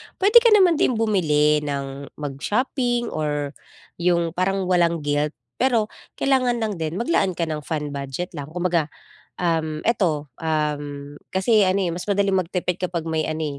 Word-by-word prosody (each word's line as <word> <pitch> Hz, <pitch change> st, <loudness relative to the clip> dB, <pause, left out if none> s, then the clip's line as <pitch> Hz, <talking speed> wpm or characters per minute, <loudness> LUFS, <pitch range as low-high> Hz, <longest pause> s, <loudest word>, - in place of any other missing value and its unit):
Puwede 415 Hz, +5 st, +7 dB
ka 475 Hz, -, +3 dB
naman 355 Hz, -6 st, +5 dB
din 250 Hz, -, +2 dB
bumili 150 Hz, -9 st, +2 dB
ng 140 Hz, -1 st, -5 dB
mag-shopping 240 Hz, -, -1 dB
or 145 Hz, -2 st, -2 dB, 0.5 s
'yong 170 Hz, -1 st, +2 dB
parang 190 Hz, +2 st, 0 dB
walang 170 Hz, -3 st, +2 dB
guilt. 145 Hz, +1 st, 0 dB, 0.2 s
Pero 235 Hz, -5 st, +2 dB, 0.3 s
kailangan 255 Hz, -3 st, +2 dB
lang 215 Hz, -2 st, -1 dB
din 160 Hz, +1 st, -3 dB
maglaan 195 Hz, -, +1 dB
ka 170 Hz, -, 0 dB
ng 155 Hz, -1 st, -3 dB
fun 150 Hz, -2 st, -3 dB
budget 140 Hz, +6 st, -5 dB
lang 145 Hz, 0 st, -6 dB
kumbaga, 170 Hz, -2 st, 0 dB, 0.5 s
um, 160 Hz, -3 st, 0 dB
eto, 165 Hz, -10 st, 0 dB
um, 145 Hz, -2 st, -3 dB, 0.2 s
kasi 200 Hz, +1 st, +4 dB
ano, 190 Hz, +2 st, +2 dB
eh, 175 Hz, -, 0 dB
mas 175 Hz, +2 st, -5 dB
madaling 200 Hz, -1 st, +2 dB
magtipid 180 Hz, 0 st, -1 dB
kapag 180 Hz, -2 st, -2 dB
may 160 Hz, -1 st, 0 dB
ano, 155 Hz, -3 st, -3 dB
170 Hz, 155 wpm, -23 LUFS, 150-200 Hz, 0.5 s, Puwede